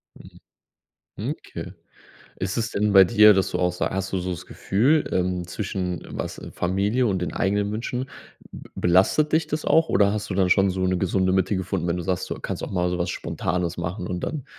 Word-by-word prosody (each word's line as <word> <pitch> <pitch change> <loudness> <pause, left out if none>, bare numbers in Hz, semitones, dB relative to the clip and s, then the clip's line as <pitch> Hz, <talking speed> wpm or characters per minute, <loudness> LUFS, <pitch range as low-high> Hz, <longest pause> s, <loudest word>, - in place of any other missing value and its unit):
Mhm. - - -15 0.8
Hm, - - -4
okay. - - -9 0.6
Ist 95 +3 -3
es 115 -1 -1
denn 105 0 0
bei 95 - +9
dir, 105 0 +6
dass 95 - +1
du - - -2
auch 90 0 +1
so 90 - -2
hast 95 0 -3
du 95 - 0
so 90 +1 -3
das 90 0 -6
Gefühl, 135 +10 +1
ähm, 90 -1 0
zwischen 90 -4 -4
was - - -5
Familie 100 +8 0
und 95 -2 0
den 90 - -3
eigenen 100 +1 0
Wünschen, 125 +4 -3 0.4
be - - -11
belastet 95 - +3
dich 160 +1 +2
das 155 0 -3
auch 160 0 +3
oder 100 +1 +3
hast 105 -1 -4
du 95 - -1
dann 95 -1 +2
schon 95 +1 +4
so 95 0 -1
'ne 95 0 +1
gesunde 95 0 +1
Mitte 95 +1 +1
gefunden, 90 -1 -2
wenn 85 - 0
du 90 - -3
sagst, 90 0 -2
du - - -1
kannst - - -4
auch - - -5
mal 90 -2 0
so 90 0 -2
was 90 +1 -1
spontanes 90 0 -2
machen 85 +2 -4
und 90 -1 -3
dann 150 - -4
95 Hz, 220 wpm, -24 LUFS, 90-105 Hz, 0.8 s, bei